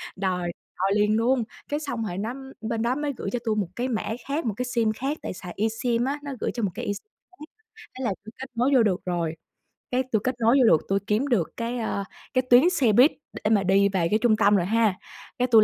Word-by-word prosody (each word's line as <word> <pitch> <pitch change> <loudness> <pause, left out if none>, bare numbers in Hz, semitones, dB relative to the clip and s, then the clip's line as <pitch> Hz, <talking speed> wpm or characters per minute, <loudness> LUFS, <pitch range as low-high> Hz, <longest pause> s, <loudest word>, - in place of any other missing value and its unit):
Đòi 180 -2 -1 0.3
đòi 195 +1 +1
liền 210 +1 +3
luôn! 240 +1 +2 0.3
Cái 295 +1 -1
xong 245 -7 -3
rồi 175 - -5
nó 220 +4 -2 0.3
bên 225 0 -2
đó 240 +2 +1
mới 295 -1 -2
gửi - - -3
cho 245 - -2
tui 220 - +1
một 205 -5 0
cái 245 +2 -1
mã 230 -4 -1 0.2
khác, 285 +1 -2
một 220 - 0
cái 250 - -1
sim 235 -3 +1
khác 275 +7 -3
tại - - -4
xài 180 -1 -8
eSIM 230 +3 0
á 280 +2 -2
nó 285 - -5
gửi - - -1
cho 235 - -3
một 195 - 0
cái - - -5
eSIM 205 - -4 0.3
khác. 300 - -8 0.5
Thế 260 - -4
là 230 - +1
tui 220 - -10
kết 265 - -7
nối 245 +4 +2
vô 250 - +6
được 190 -4 +1
rồi, 170 -3 -1 0.6
cái 255 +1 +2
tui 220 - +3
kết 255 0 0
nối 235 +4 +4
vô - - +6
được, 160 - +5
tui 195 0 +2
kiếm 220 +7 +1
được 220 - +1
cái, 235 +1 -2
ơ, 200 -3 -2 0.3
cái 255 - +3
tuyến 250 +8 +7
xe 275 -11 +2
buýt 250 +8 +6 0.3
để 210 - +2
mà 205 -3 +4
đi 195 +1 +4
về 185 -4 +1
cái 215 - +2
trung 230 -2 +4
tâm 205 -1 +4
rồi 180 -3 +2
ha. 220 -2 +2 0.4
Cái 250 - +2
tui 225 -3 +7
225 Hz, 255 wpm, -25 LUFS, 200-255 Hz, 0.6 s, tuyến